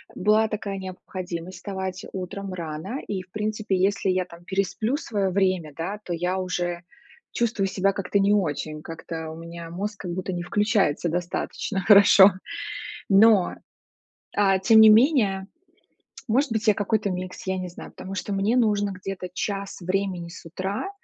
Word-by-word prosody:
была 215 +3 +3
такая 205 -2 -4
необходимость 185 -1 -6
вставать 190 -1 -5
утром 190 +1 -5
рано, 170 - -5
и 190 -2 -2
в 180 - -28
принципе, 215 -1 -1
если 195 +1 +1
я 185 -1 +1
там 170 -1 -14
пересплю 200 +8 -1
своё 200 -9 -1
время, 185 -6 +1
да, 195 +6 -4
то 175 - -3
я 180 +3 -1
уже 175 -1 -2 0.5
чувствую 225 -4 0
себя 195 +1 +1
как-то 200 +1 0
не 200 +1 +4
очень, 155 -5 -1
как-то 165 -1 -6
у - - -8
меня 170 0 -8
мозг 205 +3 -4
как 175 - -4
будто 185 0 -3
не 175 0 -3
включается 205 -5 +1
достаточно 175 +3 -2
хорошо. 200 0 +8 0.8
Но, 200 -1 +5 0.8
а, 195 -2 +4
тем 220 +3 +6
не 220 0 +9
менее, 215 -6 +4 0.8
может 260 +2 +2
быть 220 0 -1
я 210 - +6
какой-то 205 0 0
микс, 185 +1 -5
я 190 0 -1
не 180 -1 -4
знаю, 175 - -10
потому 190 +1 -8
что 200 +1 -3
мне 205 +5 +1
нужно 205 -4 +2
где-то 185 0 -6
час 200 -2 -3
времени 185 -1 -2
с 170 - -11
утра, 190 - -4
190 Hz, 160 wpm, -25 LUFS, 180-205 Hz, 0.8 s, не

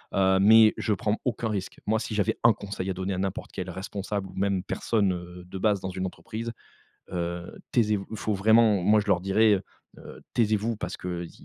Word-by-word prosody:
Heu, 95 0 +4
mais 110 +1 +7
je 110 - 0
prends 105 +2 -1
aucun 120 -2 -1
risque. 100 -3 -4
Moi 110 +1 +2
si 110 - -4
j'avais 105 -3 +1
1 115 - +7
conseil 100 -2 -5
à - - 0
donner 95 +1 -3
à - - -4
n'importe 95 0 -3
quel 95 -1 -5
responsable, 95 +1 -4
ou 95 - -13
même 95 -1 0
personne, 100 -2 0
heu, 90 0 -8
de 90 +2 -8
base 105 -1 +2
dans 95 - -4
une 95 +1 -3
entreprise, 110 +7 -6 0.6
heu: 85 0 -4
«Taisez-vous!» 105 -4 +1
Il 110 - -5
faut 105 +1 -1
vraiment 105 -1 +4
Moi 105 +2 +5
je 105 - -8
leur 95 -4 +3
dirais, 100 +1 +3 0.4
heu: - - -12
«Taisez-vous 110 0 +1
parce - - -5
qu'il 90 -2 -5
100 Hz, 205 wpm, -27 LUFS, 95-110 Hz, 0.6 s, mais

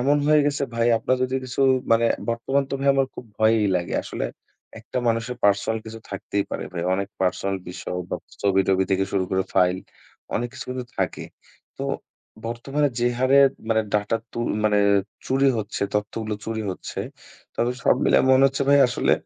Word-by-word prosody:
এমন 140 +4 +3
হয়ে 150 0 +5
গেছে 145 -1 0
ভাই 115 0 +2
আপনার 130 +3 +1
যদি 130 +1 -1
কিছু 130 +2 -4 0.3
মানে 115 +1 +4 0.3
বর্তমান 135 +4 0
তো - - -1
ভাই 140 - +1
আমার 135 -1 +2
খুব - - -8
ভয়ই 110 -1 +4
লাগে। 85 -1 -3
আসলে - - -4 0.6
একটা - - -4
মানুষের 115 +2 -1
পার্সোনাল 100 +2 +2
কিছু 115 0 -7
থাকতেই 100 0 -2
পারে - - -3
ভাই। 85 - -3
অনেক 100 +1 -2
পার্সোনাল 95 +1 0
বিষয় 90 0 -5
বা - - -1 0.3
ছবি-টবি 95 -1 +3
থেকে 95 0 +2
শুরু 95 -2 +1
করে 95 0 +1
ফাইল 90 -1 +3 0.6
অনেক 120 +1 -1
কিছু - - -7
কিন্তু 125 -1 -4
থাকে। - - -1 0.5
তো - - -3 0.6
বর্তমানে 135 +5 0
যে, 120 - +3
হারে 130 +2 +4 0.3
মানে 110 -1 +3
ডাটা 105 +2 +1 0.2
তু - - -6 0.3
মানে 105 -1 +3 0.5
চুরি 135 +1 +2
হচ্ছে 105 -1 -4
তথ্য 105 0 -1
গুলো 110 -1 -3
চুরি 110 -1 -3
হচ্ছে, 90 - -7 0.6
তবে 120 +1 +1
সব - - +5
মিলায় - - +4
মনে 130 +1 +6
হচ্ছে 135 0 -1
ভাই 140 - +7
আসলে 125 - +1
115 Hz, 180 wpm, -24 LUFS, 100-130 Hz, 0.6 s, ভাই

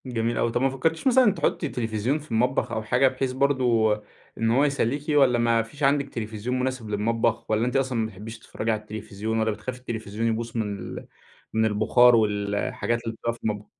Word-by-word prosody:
جميل 120 -2 -1
أوي. 115 - +1
طَب 120 - 0
ما 135 - +3
فكرتيش 160 - -1
مثلًا 255 -4 +5
تحطي 160 -5 -1
تليفزيون 115 +4 -1
في 150 - -15
المطبخ 125 +2 +1
أو 110 -1 -2
حاجة، 125 +4 +3
بحيث 130 0 -1
برضه 125 -5 +2 0.4
إن 115 0 +1
هو 130 +4 +4
يسليكِ، 140 0 0
والّا 135 -5 +4
ما 115 -1 +3
فيش 140 +6 -10
عندِك 140 0 +2
تليفزيون 115 +2 -3
مناسب 130 -4 -3
للمطبخ، 110 +2 0
والّا 110 +2 +2
أنتِ 125 - -2
أصلًا 130 -2 +1
ما 110 - +1
بتحبيش 110 +2 -8
تتفرجي 110 0 -3
على 110 -1 -1
التليفزيون، 110 +1 -4
والّا 110 0 +1
بتخافي 115 +5 -6
التليفزيون 110 -2 -4
يبوظ 115 +1 -2
من 105 -3 -2
ال - - -8 0.5
من 110 0 +2
البخار 110 +3 +5
والحاجات 105 +2 0
اللي 115 -1 -4
بتبقى 115 +1 -2
في 115 - -14
المطبخ؟ 105 -1 -2
115 Hz, 195 wpm, -25 LUFS, 110-130 Hz, 0.5 s, مثلًا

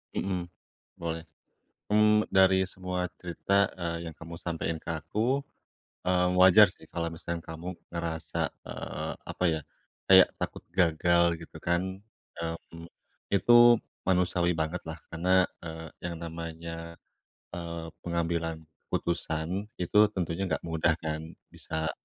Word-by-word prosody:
Mhm, 90 -3 -2 0.5
boleh. 80 -1 -3 0.7
Mmm, 105 0 +5
dari 95 0 +5
semua 90 -1 -3 0.2
cerita, 95 +3 +1
eee, 85 -1 -3
yang 80 - -12
kamu 85 0 -9
sampein 80 -1 -3
ke - - -8
aku, 115 - 0 0.6
eee, 90 -1 +3
wajar 95 -1 +8
sih - - -17
kalau 85 -1 -3
misalkan 85 0 -5
kamu 85 +3 -6 0.2
ngerasa, 85 -2 -4 0.2
eee, - - -5
apa - - -4
ya, 80 - -1 0.5
kayak 95 -1 +9
takut - - -4
gagal 85 0 +3 0.2
gitu 80 - -10
kan, 85 +2 +1 0.6
mmm, 85 0 -6 0.5
itu 120 +4 +4 0.5
manusiawi 90 -1 +2
banget 80 +2 -1
lah 80 +1 -6
karena, 90 +2 +4 0.2
eee, 80 -1 -7 0.2
yang 85 - -4
namanya, 85 0 -6 0.6
eee, 85 -1 -5
pengambilan 85 -1 -2 0.2
keputusan, 85 +4 -2
itu 90 +3 +1 0.2
tentunya 90 +1 -1
enggak 80 -4 -2
mudah 80 -1 +2
kan, 80 +1 -4 0.2
bisa 80 -1 -3
85 Hz, 120 wpm, -29 LUFS, 80-90 Hz, 0.7 s, kayak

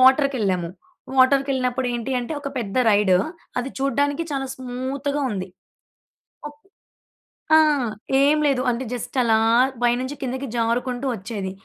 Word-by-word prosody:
వాటర్‌కేళ్ళాము. 255 - +3 0.5
వాటర్‌కేళ్ళినప్పుడు 260 -1 +2
ఏంటి 240 +2 -4
అంటే 245 +6 -5
ఒక 285 - -4
పెద్ద 210 -3 -4
రైడు, 205 -3 +4 0.4
అది 250 +2 -3
చూడడానికి 285 +3 0
చాలా 270 -1 -2
స్మూత్‌‌గా 260 +3 -3
ఉంది. 190 -3 -4 1.0
ఒక్క 295 0 -16 1.0
ఆ! - - +9 0.7
ఏం 295 +2 +4
లేదు. 270 -3 +1
అంటే 245 +2 -3
జస్ట్ 245 +2 -5
అలా 225 -2 +3 0.5
పైనుంచి 250 +3 +1
కిందకి 260 +1 -3
జారుకుంటూ 245 +2 -1
వచ్చేది. 195 -2 -5
255 Hz, 120 wpm, -22 LUFS, 230-275 Hz, 1.0 s, ఆ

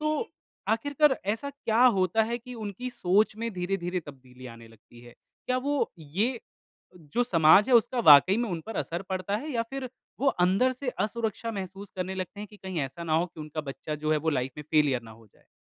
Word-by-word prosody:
तो 305 +8 -1 0.4
आखिरकर 285 +5 +2
ऐसा 225 +7 -3
क्या 245 -4 0
होता 195 -2 +4
है 235 +2 -2
कि 250 +1 -10
उनकी 220 +2 -5
सोच 210 -1 +2
में 230 +1 -2
धीरे-धीरे 180 0 -2
तब्दीली 130 -2 -12
आने 115 -1 -12
लगती 115 +1 -18
है? 120 0 -15 0.3
क्या 255 - +1
वो 285 +2 0
ये 200 - -1 0.8
जो 245 - +3
समाज 170 0 +5
है, 255 - +4
उसका 240 +2 +3
वाक़ई 160 +1 +8
में 235 -1 -1
उन 170 -2 -3
पर 225 - -6
असर 170 +3 -3
पड़ता 190 +2 -1
है? 295 +8 -5
या 230 -2 +1
फिर 270 -1 -4 0.3
वो 280 - +1 0.2
अंदर 195 +8 +3
से 255 +1 -6 0.2
असुरक्षा 225 +1 -3
महसूस 195 0 -7
करने 185 +1 -3
लगते 190 +2 -5
हैं 210 - -6
कि 210 - -14
कहीं 190 -3 -5
ऐसा 140 +5 -5
ना 160 - -2
हो 165 +2 +2
कि 165 - -13
उनका 155 +1 -5
बच्चा 150 +1 -6
जो 155 +1 -1
है 155 - +2
वो 160 +2 0
लाइफ 130 -3 -1
में 150 - -7
फेल्यर 145 -5 +3
ना 115 - -12
हो 110 0 -16
जाए? - - -29
190 Hz, 215 wpm, -27 LUFS, 155-235 Hz, 0.8 s, वाक़ई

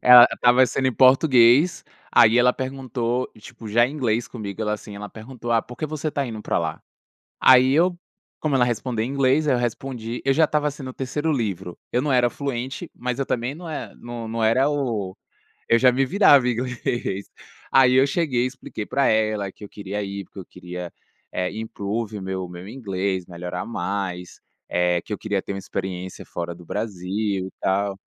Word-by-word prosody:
ela 125 -1 +10
estava 125 +1 +5
sendo 130 +1 -1
em 130 - -3
português, 130 +3 +5 0.3
aí 115 0 +6
ela 125 +1 +6
perguntou, 130 -2 -2
tipo, 115 0 -11
já 120 +3 +4
em 140 - -7
inglês 120 -5 0
comigo, 110 -2 -6
ela, 105 - 0
assim, 105 -1 -6
ela 105 0 -7
perguntou: 120 +1 -6
"Ah, 115 - +4
por 125 +2 -12
que 155 - -3
você 155 0 -3
está 140 -2 -1
indo 110 -3 -6
para - - 0
lá?" 80 -1 -3 0.6
Aí 130 0 +7
eu, 175 +4 +3 0.4
como 150 -3 -1
ela 125 -2 +4
respondia 120 -1 -2
em 115 - -2
inglês, 140 +2 +2
aí 130 - +4
eu - - +1
respondi 120 -1 -3
eu 135 0 +2
já 160 - +5
estava 150 -1 +1
sendo 135 -2 -8
o - - -10
3º 145 +5 -2
livro, 100 - -3
eu 125 - +1
não 145 -2 0
era 125 -1 +4
fluente, 135 +4 -4
mas 125 +1 -3
eu 135 - 0
também 125 +3 -2
não 175 +2 -10
é 155 -2 -6
não 120 -1 -7
não 115 0 -1
era 130 +6 +3
o 115 -10 -2 0.5
eu 115 - +6
já 125 +1 +5
me 130 +2 +2
virava, 140 -5 +5
inglês. 120 -4 -3 0.4
Aí 130 -1 +6
eu 130 +2 +5
cheguei 140 -5 0
e - - +2
expliquei 125 -4 -7
pra 140 0 +1
ela 110 -2 +1
que - - -15
eu 100 - -8
queria 105 0 -5
ir 100 0 -5
porque 100 - -12
eu 95 - -8
queria, 90 0 -8 0.4
eh, 90 0 -1
improve 110 0 -4
o - - -7
meu 95 -1 -4
meu 90 +2 -9
inglês, 95 -6 -3
melhorar 90 0 -5
mais, 90 -3 -4 0.3
eh, 90 -1 +1
que 105 - -6
eu - - -3
queria 105 -3 -2
ter 100 - -5
uma - - -4
experiência 95 -1 -5
fora 85 0 -5
do 85 0 -14
Brasil 95 0 -2
e - - -11
tal, 100 +1 0
120 Hz, 200 wpm, -23 LUFS, 100-130 Hz, 0.6 s, ela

